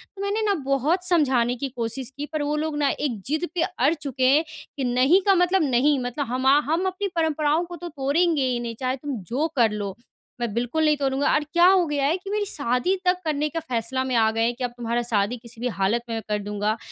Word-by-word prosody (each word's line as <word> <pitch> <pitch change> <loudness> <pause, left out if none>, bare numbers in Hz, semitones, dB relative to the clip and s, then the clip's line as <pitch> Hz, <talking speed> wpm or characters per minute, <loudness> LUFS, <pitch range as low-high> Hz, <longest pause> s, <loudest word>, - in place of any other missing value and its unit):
तो 390 - -8
मैंने 400 +2 -1
ना 420 -2 +2
बहुत 290 +7 +1
समझाने 260 -8 +2
की 275 +3 -4
कोशिश 240 0 -4
की, 290 - -3
पर 305 0 -4
वो 295 +1 -1
लोग 310 0 -2
ना 290 -1 +2
एक 245 -8 -2
ज़िद 310 +5 -1
पे 335 - +1
अड़ 310 -3 +1
चुके 275 -4 -4
हैं 285 +5 +5 0.3
कि, 275 - -2
नहीं 255 +9 +4
का 395 - +7
मतलब 360 0 +3
नहीं। 280 +1 +3
मतलब 245 +4 -3
हमा 260 +3 +3
हम 335 +4 +1
अपनी 375 +2 -2
परंपराओं 315 0 +1
को 350 0 -8
तो 345 +1 -7
तोड़ेंगे 295 +3 +1
ही 250 -2 0
नहीं, 235 -1 -5
चाहे 255 0 -1
तुम 280 +1 -5
जो 280 +7 0
कर 230 -4 +4
लो। 205 -2 -4 0.5
मैं 235 -3 -2
बिल्कुल 245 +8 0
नहीं 300 -1 +3
तोड़ूँगा 275 0 +1
और 300 - +2
क्या 345 +1 +6
हो 370 -2 +5
गया 290 -2 -1
है 325 +6 +2
कि 390 +2 -10
मेरी 420 0 0
शादी 280 0 0
तक 360 0 +3
करने 300 -1 0
का 330 - -3
फ़ैसला 260 -3 -2
में 260 -1 -2
आ 220 -1 +4
गए 225 - -2
हैं 235 - +1
कि, 255 - -6
अब 245 - -1
तुम्हारा 235 0 -1
शादी 230 0 0
किसी 235 0 -13
भी 250 - 0
हालत 210 +1 0
में 230 - -2
मैं 225 - -3
कर 210 - 0
दूँगा। 210 +1 -1
275 Hz, 245 wpm, -24 LUFS, 240-320 Hz, 0.5 s, का